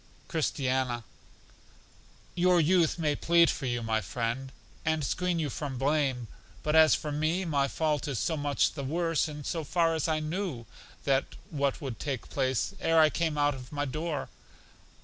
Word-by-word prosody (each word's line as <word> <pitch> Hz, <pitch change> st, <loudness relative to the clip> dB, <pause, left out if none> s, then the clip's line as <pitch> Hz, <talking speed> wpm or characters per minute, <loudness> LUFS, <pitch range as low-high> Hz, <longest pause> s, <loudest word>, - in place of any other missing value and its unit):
Christiana: 130 Hz, -6 st, 0 dB, 1.3 s
Your 180 Hz, 0 st, +4 dB
youth 170 Hz, 0 st, +3 dB
may 150 Hz, -3 st, +1 dB
plead 170 Hz, +1 st, +4 dB
for 135 Hz, -, -4 dB
you, 120 Hz, -1 st, -1 dB
my 110 Hz, 0 st, 0 dB
friend, 120 Hz, +6 st, -3 dB, 0.3 s
and 160 Hz, -1 st, 0 dB
screen 180 Hz, +5 st, 0 dB
you 155 Hz, -4 st, -1 dB
from 140 Hz, -2 st, -4 dB
blame; 135 Hz, -3 st, 0 dB, 0.4 s
but 150 Hz, +1 st, +1 dB
as 160 Hz, -1 st, +7 dB
for 150 Hz, -, -4 dB
me, 155 Hz, +5 st, 0 dB
my 140 Hz, -4 st, +1 dB
fault 150 Hz, 0 st, -1 dB
is 140 Hz, -4 st, -2 dB
so 160 Hz, -, 0 dB
much 145 Hz, -2 st, +1 dB
the 140 Hz, -, -5 dB
worse 165 Hz, +3 st, 0 dB
in 150 Hz, -1 st, -7 dB
so 165 Hz, +2 st, -2 dB
far 165 Hz, +2 st, +2 dB
as 160 Hz, 0 st, 0 dB
I 155 Hz, -1 st, +1 dB
knew 155 Hz, -5 st, -3 dB, 0.9 s
what 140 Hz, -1 st, -1 dB
would 130 Hz, -5 st, -5 dB
take 135 Hz, -5 st, -4 dB
place 130 Hz, -4 st, 0 dB
ere 165 Hz, 0 st, +3 dB
I 155 Hz, -1 st, +6 dB
came 160 Hz, -3 st, -1 dB
out 145 Hz, 0 st, +3 dB
of 125 Hz, -1 st, -10 dB
my 145 Hz, -1 st, -1 dB
door. 155 Hz, +1 st, -3 dB
150 Hz, 170 wpm, -29 LUFS, 135-160 Hz, 1.3 s, as